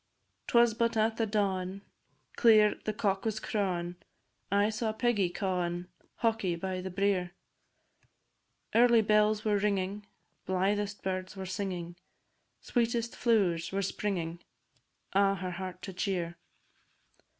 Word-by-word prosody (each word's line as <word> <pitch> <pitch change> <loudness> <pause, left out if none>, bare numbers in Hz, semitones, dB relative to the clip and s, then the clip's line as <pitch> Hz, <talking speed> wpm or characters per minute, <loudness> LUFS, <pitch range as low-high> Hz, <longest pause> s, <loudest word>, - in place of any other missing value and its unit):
'Twas 235 -1 +5
but 230 +1 0
at 220 +1 +2
the 225 - +1
dawin', 195 -2 -1 0.5
Clear 215 -2 +6
the 215 - 0
cock 195 -2 0
was 220 -1 -1
crawin', 180 -5 -2 0.5
I 205 +2 +3
saw 220 0 -1
Peggy 215 -5 +1
cawin' 180 -1 -2 0.3
Hawky 225 -6 0
by 185 +1 -3
the 190 - -5
brier. 185 -2 0 1.4
Early 235 -1 +6
bells 210 0 +3
were 210 -1 +3
ringin', 200 0 -1 0.4
Blythest 200 +2 0
birds 185 +1 -3
were 190 - -4
singin', 180 -3 -4 0.6
Sweetest 235 -1 0
flowers 185 -8 +2
were 195 +1 -1
springin', 175 -4 -2 0.7
A' 195 0 +4
her 185 -1 -4
heart 185 0 -6
to 190 - -6
cheer. 180 -3 -2
200 Hz, 120 wpm, -30 LUFS, 185-215 Hz, 1.4 s, Clear